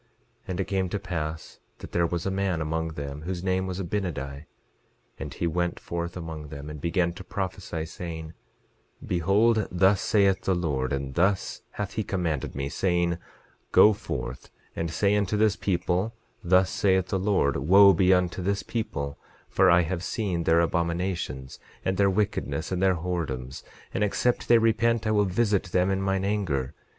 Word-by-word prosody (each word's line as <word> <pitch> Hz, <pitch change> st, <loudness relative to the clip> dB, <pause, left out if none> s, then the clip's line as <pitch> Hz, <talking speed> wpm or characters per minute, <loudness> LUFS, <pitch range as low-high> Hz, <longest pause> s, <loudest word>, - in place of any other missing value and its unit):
11:20 -, -, -39 dB, 0.4 s
And 90 Hz, 0 st, -4 dB
it 95 Hz, -, 0 dB
came 95 Hz, -1 st, -1 dB
to 100 Hz, -, -2 dB
pass 80 Hz, -5 st, -5 dB, 0.2 s
that -, -, -10 dB
there 85 Hz, -1 st, +2 dB
was 85 Hz, 0 st, -3 dB
a 95 Hz, -, 0 dB
man 95 Hz, -3 st, 0 dB
among 80 Hz, +1 st, -2 dB
them 70 Hz, -1 st, -6 dB
whose 90 Hz, +2 st, -4 dB
name 95 Hz, 0 st, 0 dB
was 95 Hz, 0 st, -4 dB
Abinadi; 80 Hz, -7 st, -3 dB, 0.7 s
and -, -, -5 dB
he -, -, -2 dB
went 85 Hz, +1 st, -1 dB
forth 85 Hz, +1 st, -4 dB
among 80 Hz, -3 st, -6 dB
them, 75 Hz, 0 st, -8 dB
and 75 Hz, -2 st, -8 dB
began 85 Hz, +1 st, +1 dB
to 90 Hz, -, -9 dB
prophesy, 95 Hz, -4 st, -4 dB
saying: 80 Hz, -1 st, -7 dB, 0.7 s
Behold, 100 Hz, +5 st, +2 dB
thus 95 Hz, +2 st, +3 dB
saith 100 Hz, -4 st, +3 dB
the 95 Hz, -, +1 dB
Lord, 70 Hz, -7 st, -1 dB
and 70 Hz, -1 st, -3 dB
thus 95 Hz, +4 st, +1 dB
hath 105 Hz, -1 st, -4 dB
he 110 Hz, -, -1 dB
commanded 85 Hz, -8 st, -2 dB
me, 70 Hz, 0 st, -2 dB
saying, 85 Hz, +2 st, 0 dB, 0.5 s
Go 105 Hz, -, +7 dB
forth, 65 Hz, -10 st, -6 dB, 0.3 s
and 85 Hz, 0 st, -2 dB
say 100 Hz, +5 st, +2 dB
unto 105 Hz, 0 st, +1 dB
this 105 Hz, -1 st, +3 dB
people, 95 Hz, +2 st, -1 dB, 0.3 s
thus 90 Hz, +1 st, +4 dB
saith 95 Hz, -2 st, +2 dB
the 95 Hz, -, 0 dB
Lord—Wo 95 Hz, +1 st, +5 dB
be 95 Hz, -1 st, +3 dB
unto 90 Hz, 0 st, +2 dB
this 100 Hz, +2 st, -1 dB
people, 70 Hz, -11 st, -4 dB, 0.3 s
for -, -, +4 dB
I 85 Hz, 0 st, +6 dB
have 85 Hz, +1 st, -3 dB
seen 90 Hz, -7 st, -2 dB
their 80 Hz, +1 st, +4 dB
abominations, 85 Hz, -6 st, -2 dB, 0.3 s
and 95 Hz, 0 st, 0 dB
their 100 Hz, -1 st, +4 dB
wickedness, 95 Hz, -4 st, -1 dB
and 90 Hz, -1 st, -1 dB
their 95 Hz, -1 st, +4 dB
whoredoms; 80 Hz, -7 st, -4 dB, 0.3 s
and -, -, 0 dB
except 120 Hz, +4 st, 0 dB
they 120 Hz, -, +7 dB
repent 115 Hz, 0 st, +2 dB
I 110 Hz, -, +1 dB
will 105 Hz, -1 st, +3 dB
visit 100 Hz, +1 st, +1 dB
them 90 Hz, +1 st, +1 dB
in 95 Hz, 0 st, 0 dB
mine 95 Hz, 0 st, 0 dB
anger. 75 Hz, -10 st, -1 dB
90 Hz, 175 wpm, -26 LUFS, 80-100 Hz, 0.7 s, Go